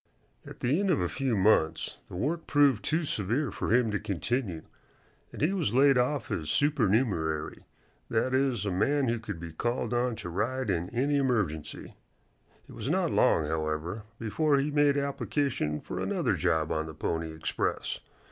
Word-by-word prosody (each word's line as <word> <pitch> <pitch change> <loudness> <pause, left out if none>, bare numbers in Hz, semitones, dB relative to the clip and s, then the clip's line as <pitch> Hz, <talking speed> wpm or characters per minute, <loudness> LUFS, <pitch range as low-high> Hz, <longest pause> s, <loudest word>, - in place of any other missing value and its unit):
At - - -11
the 135 +8 +2
end 200 -1 +1
of 170 - +3
a 90 - +1
few 130 +3 -1
months 95 -5 +2
the - - -9
work 155 - -2
proved 140 -6 +4
too 165 +2 +1
severe 120 +2 -1
for - - -3
him 115 -1 +3
to 100 - 0
continue, 100 -2 -2 0.7
and - - -5
he 170 +6 +3
was 160 - 0
laid 135 +1 +6
off 125 +1 0
as 80 -2 -2
supernumerary 105 - +1 0.4
that 120 +3 +1
is, 130 -5 +1
a 100 - 0
man 135 +8 +2
who 120 0 0
could 105 -6 -6
be 85 0 -7
called 120 +9 -2
on 120 0 +1
to 90 - -6
ride 120 +6 -1
in 90 0 -1
any 135 +5 +1
emergency. 105 - -1 0.7
It - - -12
was - - -4
not - - +1
long, 80 - +3
however, 80 +5 -2 0.2
before 140 +7 +1
he 140 +2 0
made 145 -1 +3
application 140 - -1
for - - -6
another - - 0
job 80 -1 +1
on 80 0 -1
the 80 - -8
Pony 80 +1 -2
Express. 80 0 -2
120 Hz, 175 wpm, -29 LUFS, 85-140 Hz, 0.7 s, laid